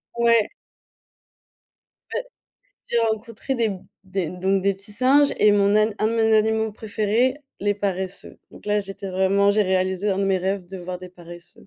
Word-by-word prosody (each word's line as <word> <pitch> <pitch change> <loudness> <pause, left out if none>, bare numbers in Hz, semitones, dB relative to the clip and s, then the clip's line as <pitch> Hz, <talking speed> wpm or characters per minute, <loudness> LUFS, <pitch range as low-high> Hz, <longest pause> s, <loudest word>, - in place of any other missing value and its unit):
Ouais. 235 -2 +3 1.7
Beh, - - -1 0.6
j'ai 235 - 0
rencontré 230 +3 -2
des 230 -3 +1 0.3
des 190 -4 -3
donc 190 +2 0
des 200 0 +2
petits 195 +2 -7
singes 270 +6 +4
et 210 0 +5
mon 200 0 +3
an 215 +1 +3
un 215 - +2
de 225 - 0
mes 225 -1 +2
animaux 220 0 +2
préférés: 220 +5 0 0.2
«les 205 0 +1
paresseux» 190 -1 -4
donc - - -14
là 210 0 +2
j'étais 195 -1 -6
vraiment 195 +2 +3
j'ai 210 +1 +3
réalisé 190 +1 0
un 190 - -1
de 195 - +1
mes 195 -1 +2
rêves 190 +1 -2
de 190 +1 -8
voir 180 0 -6
des 185 - -10
paresseux. 175 -1 -14
200 Hz, 175 wpm, -23 LUFS, 190-220 Hz, 1.7 s, et